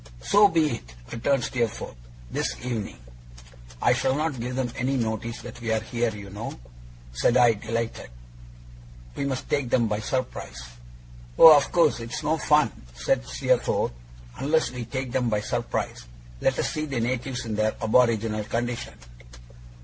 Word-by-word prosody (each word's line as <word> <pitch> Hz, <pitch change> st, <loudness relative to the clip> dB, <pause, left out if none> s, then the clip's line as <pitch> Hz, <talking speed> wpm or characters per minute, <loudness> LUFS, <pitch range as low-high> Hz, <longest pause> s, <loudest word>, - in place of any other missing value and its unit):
'So 205 Hz, -, +5 dB
be 160 Hz, -5 st, +2 dB
it!' -, -, -16 dB, 0.2 s
returned 135 Hz, +2 st, +1 dB
Steerforth. 120 Hz, -, -2 dB, 0.4 s
'This -, -, -1 dB
evening.' 115 Hz, -5 st, -3 dB, 0.9 s
'I 120 Hz, -, +5 dB
shall 130 Hz, +1 st, +1 dB
not 150 Hz, -3 st, -1 dB
give 125 Hz, +2 st, -4 dB
them 130 Hz, -2 st, -1 dB
any 130 Hz, +2 st, 0 dB
notice 115 Hz, 0 st, -3 dB
that 120 Hz, 0 st, -9 dB
we 115 Hz, -1 st, -2 dB
are 110 Hz, -, +2 dB
here, 120 Hz, +2 st, -1 dB
you 100 Hz, -2 st, -9 dB
know,' 105 Hz, -, -6 dB, 0.5 s
said 120 Hz, -, +3 dB
I, 120 Hz, -2 st, +6 dB
delighted. 115 Hz, -, -4 dB, 1.1 s
'We 140 Hz, -, -2 dB
must 135 Hz, -2 st, -3 dB
take 140 Hz, -4 st, 0 dB
them 120 Hz, -1 st, +3 dB
by 105 Hz, -1 st, -1 dB
surprise.' 110 Hz, -, -4 dB, 0.7 s
'Oh, 160 Hz, -2 st, +11 dB
of 140 Hz, -1 st, +2 dB
course! 170 Hz, -7 st, +3 dB
It's 115 Hz, +5 st, -5 dB
no 155 Hz, +2 st, +1 dB
fun,' 150 Hz, -7 st, +3 dB, 0.2 s
said -, -, 0 dB
Steerforth, -, -, +1 dB, 0.5 s
'unless 155 Hz, +2 st, +1 dB
we 125 Hz, -2 st, -5 dB
take 130 Hz, +2 st, -4 dB
them 125 Hz, -2 st, +1 dB
by 105 Hz, -2 st, 0 dB
surprise. -, -, -3 dB, 0.4 s
Let 135 Hz, -, +2 dB
us -, -, 0 dB
see 155 Hz, 0 st, -2 dB
the 135 Hz, -4 st, -2 dB
natives 125 Hz, +1 st, -2 dB
in 110 Hz, -, -3 dB
their 110 Hz, +1 st, +1 dB
aboriginal 110 Hz, -2 st, +2 dB
condition. 120 Hz, +2 st, -3 dB
120 Hz, 155 wpm, -26 LUFS, 110-135 Hz, 1.1 s, Oh